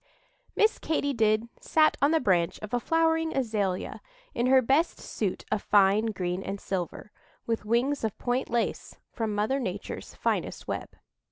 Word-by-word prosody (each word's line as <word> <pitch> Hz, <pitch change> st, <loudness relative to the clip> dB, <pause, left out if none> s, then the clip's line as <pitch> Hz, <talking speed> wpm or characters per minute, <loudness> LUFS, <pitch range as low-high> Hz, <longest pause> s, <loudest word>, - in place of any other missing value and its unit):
MISS 430 Hz, +1 st, +3 dB
KATY 285 Hz, -3 st, 0 dB
DID 220 Hz, -1 st, +2 dB
sat 310 Hz, -1 st, +3 dB
on 285 Hz, -, +5 dB
the 320 Hz, 0 st, +3 dB
branch 180 Hz, -, +1 dB
of 215 Hz, -, -7 dB
a 245 Hz, -, +2 dB
flowering 325 Hz, +2 st, +1 dB
azalea, 210 Hz, -7 st, -1 dB, 0.3 s
in 240 Hz, -, 0 dB
her 265 Hz, 0 st, +6 dB
best 270 Hz, +7 st, +2 dB
suit 200 Hz, -4 st, -3 dB
of 215 Hz, -, +1 dB
fine 205 Hz, +2 st, +4 dB
green 185 Hz, -3 st, -2 dB
and 195 Hz, +1 st, -5 dB
silver, 190 Hz, +2 st, -4 dB, 0.3 s
with 225 Hz, -2 st, -2 dB
wings 240 Hz, +6 st, +1 dB
of 220 Hz, -2 st, -2 dB
point 245 Hz, +1 st, -1 dB
lace 235 Hz, -1 st, -2 dB, 0.2 s
from 220 Hz, -3 st, -2 dB
Mother 215 Hz, +7 st, +1 dB
Nature's 200 Hz, -5 st, -5 dB
finest -, -, -2 dB
web. -, -, -3 dB
225 Hz, 160 wpm, -28 LUFS, 205-270 Hz, 0.3 s, her